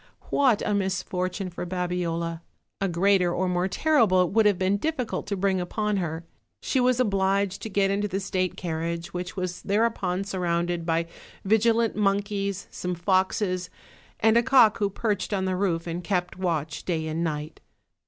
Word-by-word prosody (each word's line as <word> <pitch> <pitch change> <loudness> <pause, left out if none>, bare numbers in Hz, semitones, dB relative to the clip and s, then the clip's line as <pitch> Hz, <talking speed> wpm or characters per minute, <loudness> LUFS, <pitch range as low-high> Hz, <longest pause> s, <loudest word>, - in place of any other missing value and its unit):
What 260 -7 +3
a 210 - +1
misfortune 185 -1 -2
for 175 - -5
Babiola! 175 -2 -2 0.4
a 195 - +2
greater, 180 0 +3
or 185 +2 0
more 180 0 +1
ter 310 +10 +1
rible, 185 -6 +5
it - - -5
would 220 +1 +4
have 205 -3 +3
been 190 +2 +1
difficult 255 -4 -2
to 200 -1 -2
bring 190 -1 +1
upon 210 +3 -1
her; 165 -2 -3 0.3
she 265 - 0
was 250 0 +3
obliged 195 -3 +1
to 220 - -5
get 195 -1 +2
into 205 +1 0
the 195 -1 -2
state 185 -2 -2
carriage, 170 0 -3
which 180 0 -5
was 180 -2 -4
thereupon 200 -3 0
surrounded 175 -3 -1
by 165 0 +1 0.4
vigilant 225 +2 +3
monkeys, 200 -1 0
some 180 0 -3
foxes, 185 +1 0 0.5
and 225 +1 +4
a - - +6
cock 235 -4 +5
who 205 -2 +1
perched 205 0 -2
on 190 -1 0
the 185 0 0
roof 180 -3 0
and 170 +1 -4
kept 180 -1 -1
watch 160 -5 -2
day 160 -3 -1
and 160 +2 -2
night. 155 -1 -4
190 Hz, 175 wpm, -26 LUFS, 175-205 Hz, 0.5 s, a